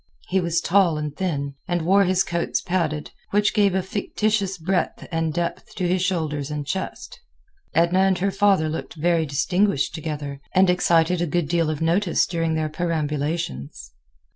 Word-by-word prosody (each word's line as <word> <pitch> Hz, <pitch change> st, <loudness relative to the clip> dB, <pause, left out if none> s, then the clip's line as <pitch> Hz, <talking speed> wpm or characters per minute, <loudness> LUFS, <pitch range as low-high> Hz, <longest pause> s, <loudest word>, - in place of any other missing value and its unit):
He 190 Hz, +1 st, +2 dB
was 170 Hz, -1 st, 0 dB
tall 180 Hz, -4 st, +3 dB
and 150 Hz, -1 st, -4 dB
thin, 145 Hz, -6 st, -2 dB
and 175 Hz, -3 st, -1 dB
wore 195 Hz, +4 st, +4 dB
his 185 Hz, +1 st, +2 dB
coats 170 Hz, 0 st, -1 dB
padded, 165 Hz, -5 st, -2 dB, 0.2 s
which 205 Hz, +1 st, +2 dB
gave 200 Hz, -3 st, +3 dB
a 190 Hz, -, +1 dB
fictitious 200 Hz, 0 st, -1 dB
breadth 180 Hz, +2 st, -1 dB
and 165 Hz, -1 st, 0 dB
depth 170 Hz, +2 st, -4 dB
to 180 Hz, -, -1 dB
his 180 Hz, +1 st, +1 dB
shoulders 155 Hz, -6 st, -1 dB
and 150 Hz, -1 st, -4 dB
chest. 190 Hz, +7 st, -5 dB, 0.6 s
Edna 170 Hz, +3 st, +3 dB
and 190 Hz, -1 st, +3 dB
her 195 Hz, +2 st, 0 dB
father 195 Hz, -6 st, +3 dB
looked 155 Hz, +2 st, -5 dB
very 165 Hz, 0 st, +1 dB
distinguished 180 Hz, +3 st, +1 dB
together, 145 Hz, -3 st, -5 dB
and 185 Hz, -1 st, +5 dB
excited 175 Hz, -1 st, +2 dB
a 175 Hz, -, 0 dB
good 170 Hz, 0 st, 0 dB
deal 165 Hz, 0 st, +1 dB
of 155 Hz, 0 st, -2 dB
notice 175 Hz, +3 st, +2 dB
during 165 Hz, -2 st, -1 dB
their 155 Hz, -1 st, 0 dB
perambulations. 150 Hz, -, -3 dB
170 Hz, 165 wpm, -23 LUFS, 155-185 Hz, 0.6 s, and